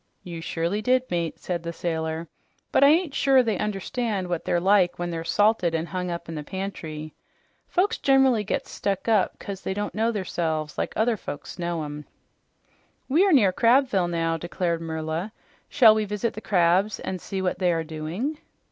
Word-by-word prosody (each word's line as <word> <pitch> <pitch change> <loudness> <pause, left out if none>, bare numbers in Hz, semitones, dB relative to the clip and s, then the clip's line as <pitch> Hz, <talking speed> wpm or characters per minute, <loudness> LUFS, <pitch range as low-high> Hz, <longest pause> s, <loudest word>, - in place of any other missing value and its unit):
"You 170 -2 -7
surely 170 +5 -2
did, 255 +3 +3
mate," 170 -2 -1
said 175 -2 -3
the 170 0 -4
sailor, 160 -1 -3 0.4
"but - - +4
I - - +9
ain't 320 0 +3
sure 270 -2 +4
they 220 -5 -1
understand 210 -1 -2
what 175 -2 -2
they're 175 - +1
like 185 -1 +3
when 175 0 -3
they're 165 -1 -3
salted 195 -1 +2
an' 160 0 -1
hung 180 +1 -4
up 170 -1 -5
in 165 - -6
the 150 -1 -5
pantry. 155 -4 -6 0.5
Folks 400 +5 +1
gener'ly 265 -5 +4
gets 210 - -3
stuck 195 +1 -2
up 215 -4 +2
'cause 195 -1 -7
they 190 - -3
don't 205 0 -3
know 225 +2 +1
theirselves 160 -7 -2
like - - -2
other 225 +1 +2
folks 150 0 -8
knows 170 -2 -2
'em." 150 0 -7 1.0
"We 315 +8 +4
are - - +3
near 210 - +5
Crabville 230 -6 +3
now," 165 -1 0
declared 170 0 -2
Merla. 160 +5 -3 0.4
"Shall 230 -6 +7
we 215 0 0
visit 210 +3 -2
the 215 - -7
crabs 185 +2 +2
and 185 -2 -4
see 195 - -4
what 180 -1 -1
they 180 -2 +3
are 165 -1 0
doing?" 165 - -4
185 Hz, 185 wpm, -25 LUFS, 165-220 Hz, 1.0 s, I